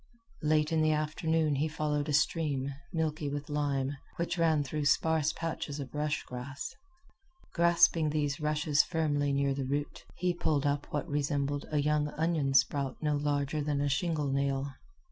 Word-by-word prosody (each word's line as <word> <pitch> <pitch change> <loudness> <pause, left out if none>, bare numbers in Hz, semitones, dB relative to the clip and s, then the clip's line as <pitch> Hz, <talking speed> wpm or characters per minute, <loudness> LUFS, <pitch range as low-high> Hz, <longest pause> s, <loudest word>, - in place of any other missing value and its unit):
Late 155 0 +2
in 160 -1 +2
the 155 0 +3
afternoon 155 0 0
he 150 +3 +1
followed 150 -1 -1
a - - 0
stream, 140 -2 +1 0.2
milky 155 -3 -1
with 145 +1 -5
lime, 140 -2 -1 0.2
which 170 +1 -1
ran 160 -3 +3
through 145 +2 -3
sparse 160 +1 +3
patches 160 -3 -4
of 135 -2 -7
rush 150 0 -1
grass. 125 +3 -6 0.8
Grasping 170 -2 +4
these 145 -1 -1
rushes 150 -1 +2
firmly 145 -4 0
near 140 0 +1
the 135 0 -3
root, 145 +2 -3
he 180 0 0
pulled 150 -4 0
up 145 0 0
what 150 +3 -2
resembled 145 -1 -1
a 150 - -1
young 150 0 +2
onion 155 -4 +1
sprout 135 +1 +2
no 150 -1 +2
larger 145 0 0
than 145 -1 -1
a 145 0 +1
shingle 150 0 0
nail. 140 0 0
150 Hz, 165 wpm, -31 LUFS, 140-155 Hz, 0.8 s, Grasping